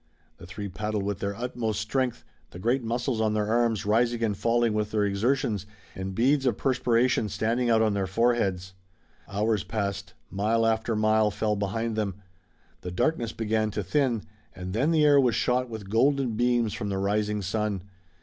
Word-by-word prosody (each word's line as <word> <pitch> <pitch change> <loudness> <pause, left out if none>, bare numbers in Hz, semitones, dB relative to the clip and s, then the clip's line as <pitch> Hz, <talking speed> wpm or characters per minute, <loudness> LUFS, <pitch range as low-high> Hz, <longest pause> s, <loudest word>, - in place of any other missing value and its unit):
The 85 - -12
three 100 +3 -6
paddled 105 +2 -3
with 100 -1 -2
their 100 0 -3
utmost 115 -2 -2
strength, 120 +2 -1 0.2
the - - -11
great 120 +8 +1
muscles 120 0 -1
on 110 -1 +1
their 105 -1 0
arms 115 -4 +1
rising 115 +2 +2
and 105 -3 +1
falling 115 +1 +1
with 105 0 -1
their 105 -1 +1
exertions, 105 0 0 0.3
and 95 0 -5
beads 135 +4 +2
of 125 - +1
perspiration 125 -4 +1
standing 120 +4 0
out 110 -1 +4
on 110 -2 +2
their 100 -1 -1
foreheads. 95 -4 0 0.5
Hours 105 +1 0
passed. 100 -3 -4 0.2
Mile 110 +4 +1
after 110 0 +1
mile 110 0 +3
fell 105 +1 -1
behind 110 +3 -2
them. 105 -4 -1 0.7
The 90 - -5
darkness 120 - 0
began 110 -1 0
to 105 -1 -3
thin, 120 - 0 0.3
and 95 0 -6
then 130 +9 +1
the 160 -2 +4
air 145 -1 +6
was 125 -4 +3
shot 125 0 +1
with 105 -4 -8
golden 135 +2 +2
beams 120 -1 +1
from 105 - -4
the 95 - -1
rising 105 +1 0
sun. 105 -1 -2
110 Hz, 180 wpm, -27 LUFS, 100-120 Hz, 0.7 s, air